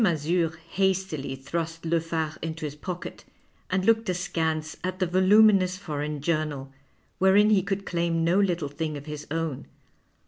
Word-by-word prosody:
Mazure 165 -2 +1
hastily 190 -8 0
thrust 165 +5 -4
Le 165 +1 +2
Phare 160 -1 -2
into 160 0 -4
his 145 - -4
pocket 175 +4 -7 0.5
and 185 0 0
looked 225 -2 +3
askance 160 -3 -1
at 185 0 -2
the 185 - +1
voluminous 185 +1 +5
foreign 150 -5 -4
journal, 150 -4 -2 0.5
wherein 200 +3 +5
he 200 -3 +5
could 195 +1 -3
claim 170 -1 0
no 170 +4 +3
little 175 -6 +1
thing 155 +1 -3
of 145 - -9
his 150 -1 -7
own. 160 -3 -3
165 Hz, 150 wpm, -26 LUFS, 155-185 Hz, 0.5 s, voluminous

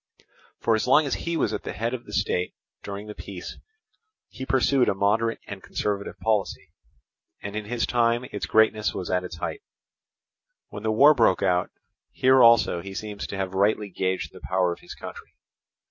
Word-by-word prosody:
For 115 - +2
as 110 +2 0
long 150 +4 +5
as 140 - -1
he 170 0 -2
was - - 0
at - - -3
the - - -6
head 115 +3 -2
of 125 -2 -5
the - - -10
state 95 -3 -1 0.3
during 100 +1 -6
the 105 - -7
peace, 95 -3 -8 0.7
he 130 - -8
pursued 135 0 +3
a - - 0
moderate 110 +4 +1
and 100 -1 -8
conservative 100 +1 -3
policy; 110 -3 -1 0.7
and 100 +1 -6
in 105 0 -3
his 120 +2 -1
time 120 0 +1
its 105 - -4
greatness 110 -2 +3
was 90 - -4
at 90 0 +1
its 90 -2 -7
height. 415 - -4 1.1
When 105 - -8
the 110 0 0
war 140 +8 +7
broke 115 -9 +3
out, 90 -1 +2 0.4
here 130 0 +4
also 115 -7 +5
he 95 +2 -8
seems 105 0 -5
to 100 - -6
have 95 -1 -3
rightly 100 +2 +1
gauged 95 +1 -2
the - - -13
power 90 -1 +1
of - - -13
his - - -11
country. - - -10
105 Hz, 190 wpm, -25 LUFS, 95-115 Hz, 1.1 s, war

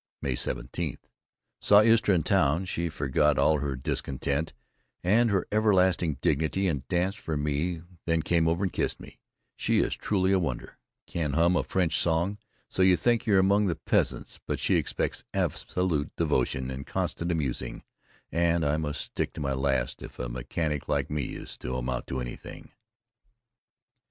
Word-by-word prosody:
May 65 - -1
17: 60 +5 -3 0.6
Saw 105 0 +6
Istra 115 -3 +4
in 80 - +1
town, 85 -2 +2
she 85 -2 -2
forgot 75 -1 +1
all 80 -1 +4
her 70 -2 -2
discontent 70 +3 -2 0.5
and 115 +6 +4
her 100 -3 +1
everlasting 95 -6 +3
dignity 80 +6 +1
and 70 -6 -2
danced 95 +4 0
for 80 -2 -3
me 75 +4 -1 0.2
then 85 -1 +2
came 85 0 +2
over 85 +4 +1
and 95 - -1
kissed - - -1
me, - - -13 0.4
she - - +1
is - - +2
truly 95 -2 +1
a 95 - +4
wonder, 65 -9 -4 0.3
can 80 -5 -2
hum 85 +4 +3
a - - +3
French 90 -4 0
song 85 +5 +1 0.3
so - - -2
you 95 -1 +6
think 120 +2 +1
you're 100 -3 +5
among 100 +2 +4
the 85 - 0
peasants, - - -1
but - - -1
she - - +1
expects - - -1
absolute 85 -5 0
devotion 65 -4 0
and 65 +1 -6
constant 85 +1 -2
amusing 75 -7 -2 0.5
and 85 -1 +2
I 75 +1 +2
must 75 -2 -2
stick - - -3
to - - -8
my 70 -2 -1
last 65 -2 0
if - - -10
a 60 - -3
mechanic 70 +5 -3
like - - 0
me 75 -3 -2
is - - -8
to 65 - -4
amount 65 0 -3
to 65 - -3
anything. - - -8
80 Hz, 165 wpm, -28 LUFS, 70-95 Hz, 0.6 s, Saw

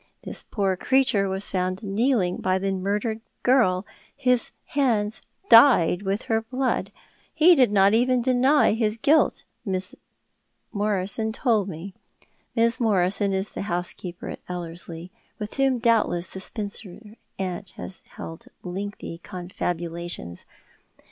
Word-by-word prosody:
This - - -5
poor 195 -3 -1
creature 240 -3 +2
was 190 +1 -2
found 185 +2 -2
kneeling 205 -2 +1
by 185 0 +1
the 195 +1 -1
murdered 205 +4 -2 0.2
girl, 210 -7 +3 0.3
his 250 -3 +3 0.2
hands 225 -6 0 0.3
dyed 230 - +7
with 195 +1 -2
her 225 0 0
blood. 255 +3 -2 0.4
He 335 +3 +7
did 255 -9 +4
not 200 0 +5
even 250 +2 +3
deny 260 +4 +4
his 220 -1 0
guilt, 295 +7 +3 0.2
Mrs. 185 -2 -3 0.8
Morison 205 +1 0
told 220 -4 +1
me." 180 +3 -7 0.6
Mrs. 230 +2 +3
Morison 200 -2 +2
is 190 +1 -1
the - - -6
housekeeper 175 0 -4
at - - -7
Ellerslie, 170 0 -6 0.3
with 210 -1 -6
whom 270 -2 +3
doubtless 225 -7 +2
the 190 - -8
spinster 210 +1 -7 0.2
aunt 185 0 -4
has 185 - -8
held 165 - -9 0.2
lengthy 190 -2 -6
confabulations. 175 - -5
200 Hz, 125 wpm, -24 LUFS, 185-230 Hz, 0.8 s, dyed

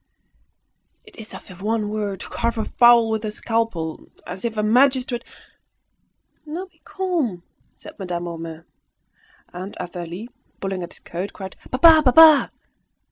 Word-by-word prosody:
It - - -18
is 220 -2 -9
as - - -12
if 185 +1 -13
one 215 0 -1
were 210 -2 -3
to - - -10
carve 235 0 -2
a 220 - -1
fowl 240 -2 +5
with 220 0 -1
a 215 - -2
scalpel; 210 -7 -2 0.2
as 190 - -8
if 230 -2 -3
a 210 - +1
magistrate 250 +1 +2 0.7
" - - -47
"Now 335 +5 -5
be 375 - -29
calm," 325 - -2 0.3
said - - -13
Madame 175 -2 -4
Homais. 165 -1 -7 0.9
And 185 +3 -7
Athalie, 175 +4 -6 0.3
pulling 195 -1 -3
at 175 - -7
his - - -15
coat, 180 +4 -6
cried 190 -2 -8
"Papa! 315 +4 +7
papa!" 305 +3 +7
215 Hz, 150 wpm, -22 LUFS, 180-245 Hz, 0.9 s, Papa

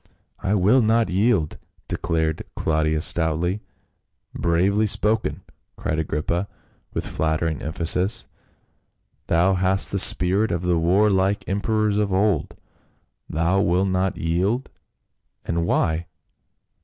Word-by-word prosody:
" - - -49
I 100 - 0
will 105 +7 +4
not 115 -1 +2
yield 95 -5 +1
!" - - -38
declared 80 -2 -1
Claudius 80 0 0
stoutly. 85 +4 0 0.7
"Bravely 95 +6 +1
spoken!" 110 +2 0 0.3
cried 80 0 -2
Agrippa, 80 +4 -2 0.4
with - - -3
flattering 80 -1 -1
emphasis, 90 +8 +1 0.5
" - - -47
thou 90 +4 +3
hast 95 +1 +1
the 100 - -1
spirit 95 +4 +3
of 85 0 -2
the 90 -2 +1
war 95 +6 +3
like 95 +1 0
em 100 +2 -1
perors 110 -2 +1
of 105 -2 0
old. 100 +2 0 0.7
Thou 85 +5 +1
wilt 95 +1 +1
not 95 0 0
yield, 95 +10 -1 0.7
and 85 0 -1
why 85 0 0
90 Hz, 125 wpm, -23 LUFS, 85-100 Hz, 0.7 s, will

